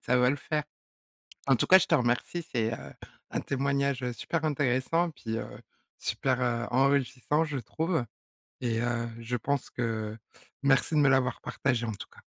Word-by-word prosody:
ça 125 Hz, -, +2 dB
va 125 Hz, 0 st, +4 dB
le 145 Hz, -, 0 dB
faire. 150 Hz, +1 st, -2 dB, 0.8 s
En 135 Hz, -, +6 dB
tout -, -, 0 dB
cas 190 Hz, -, +10 dB
je -, -, +1 dB
te -, -, +3 dB
remercie, 125 Hz, +8 st, 0 dB
c'est, 115 Hz, -2 st, +1 dB
heu, -, -, -8 dB, 0.4 s
un -, -, -2 dB
témoignage, 140 Hz, -1 st, 0 dB
heu, 125 Hz, -, -1 dB
super 160 Hz, +7 st, -2 dB
intéressant 150 Hz, +4 st, +1 dB
puis, 115 Hz, -6 st, -4 dB
heu, -, -, -4 dB, 0.5 s
super, 130 Hz, -2 st, 0 dB
heu, 120 Hz, -1 st, 0 dB
enrichissant, 135 Hz, +3 st, +2 dB
je 150 Hz, -3 st, -3 dB
trouve 160 Hz, +1 st, -1 dB, 0.6 s
et, 115 Hz, -2 st, 0 dB
heu, 120 Hz, -1 st, -1 dB
je 115 Hz, +1 st, -3 dB
pense 140 Hz, +4 st, -1 dB
que 110 Hz, -2 st, -3 dB, 0.5 s
merci 140 Hz, +3 st, +3 dB
de -, -, +5 dB
me 140 Hz, -2 st, +5 dB
l'avoir 130 Hz, -2 st, +2 dB
partagé 125 Hz, -4 st, -1 dB
en 110 Hz, -, -2 dB
tout -, -, -8 dB
cas. -, -, -17 dB
130 Hz, 180 wpm, -29 LUFS, 120-140 Hz, 0.8 s, cas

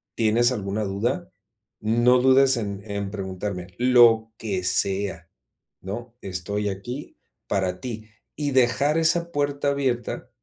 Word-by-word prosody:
tienes 115 Hz, +2 st, +3 dB
alguna 105 Hz, -2 st, -2 dB
duda, 120 Hz, -, -2 dB, 0.5 s
no 120 Hz, +3 st, +4 dB
dudes 130 Hz, 0 st, +5 dB
en 100 Hz, -3 st, -4 dB
en 100 Hz, -1 st, -3 dB
preguntarme, 95 Hz, -2 st, -5 dB
lo 120 Hz, -3 st, +5 dB
que 100 Hz, -5 st, -3 dB
sea, 95 Hz, -2 st, 0 dB, 0.5 s
¿no? 115 Hz, +5 st, -7 dB
Estoy 100 Hz, +3 st, -3 dB
aquí 120 Hz, +9 st, -7 dB, 0.3 s
para 95 Hz, -2 st, -1 dB
ti". 110 Hz, -3 st, -6 dB, 0.3 s
Y 145 Hz, -1 st, -1 dB
dejar 130 Hz, +4 st, +3 dB
esa 170 Hz, +1 st, +2 dB
puerta 145 Hz, -1 st, 0 dB
abierta, 130 Hz, -4 st, -2 dB
115 Hz, 120 wpm, -24 LUFS, 100-130 Hz, 0.5 s, dudes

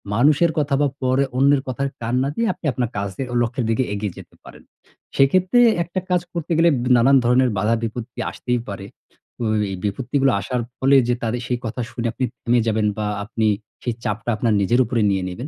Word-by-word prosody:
মানুষের 150 Hz, +7 st, +4 dB
কথা 145 Hz, -2 st, +1 dB
বা 145 Hz, -, +4 dB
পরে 130 Hz, +1 st, +2 dB
অন্যের 140 Hz, +1 st, +4 dB
কথায় 135 Hz, +2 st, -2 dB
কান 120 Hz, +2 st, -1 dB
না 135 Hz, -, -1 dB
দিয়ে 230 Hz, -, 0 dB
আপনি -, -, -13 dB
আপনার 120 Hz, -2 st, -1 dB
কাজে 100 Hz, +5 st, -3 dB
ও -, -, -5 dB
লক্ষ্যের 120 Hz, +1 st, -1 dB
দিকে 115 Hz, +4 st, +1 dB
এগিয়ে 100 Hz, -3 st, -4 dB
যেতে -, -, -13 dB
পারেন। -, -, -14 dB, 0.5 s
সেক্ষেত্রে 185 Hz, -, +3 dB, 0.2 s
একটা 175 Hz, +2 st, -4 dB
কাজ 180 Hz, -1 st, +2 dB
করতে 170 Hz, -1 st, -4 dB
গেলে 170 Hz, +1 st, +5 dB, 0.3 s
নানান 130 Hz, +3 st, +5 dB
ধরনের 125 Hz, +1 st, +4 dB
বাধা 105 Hz, +4 st, +2 dB
বিপত্তি 115 Hz, +1 st, -5 dB
আসতেই 125 Hz, 0 st, -2 dB
পারে। 100 Hz, -1 st, -6 dB, 0.5 s
তো -, -, -5 dB, 0.3 s
এই -, -, -3 dB
বিপত্তিগুলো 130 Hz, +6 st, 0 dB
আসার 120 Hz, +5 st, -2 dB, 0.2 s
ফলে 135 Hz, +1 st, +3 dB
যে, 120 Hz, -, +2 dB
তাদের 120 Hz, +1 st, -1 dB
সেই 125 Hz, -1 st, -1 dB
কথা 115 Hz, +3 st, -3 dB
শুনে 120 Hz, -1 st, -3 dB
আপনি 130 Hz, -, -1 dB, 0.2 s
থেমে 120 Hz, +1 st, +2 dB
যাবেন 110 Hz, -1 st, +1 dB
বা 105 Hz, -, -2 dB, 0.2 s
আপনি 110 Hz, +1 st, -1 dB, 0.4 s
সেই 120 Hz, -, -1 dB
চাপটা 105 Hz, +3 st, -3 dB
আপনার 115 Hz, 0 st, +1 dB
নিজের 120 Hz, +6 st, +2 dB
উপরে 115 Hz, 0 st, -1 dB
নিয়ে 95 Hz, -1 st, 0 dB
নিবেন, 120 Hz, +10 st, -6 dB
125 Hz, 200 wpm, -21 LUFS, 110-135 Hz, 0.5 s, গেলে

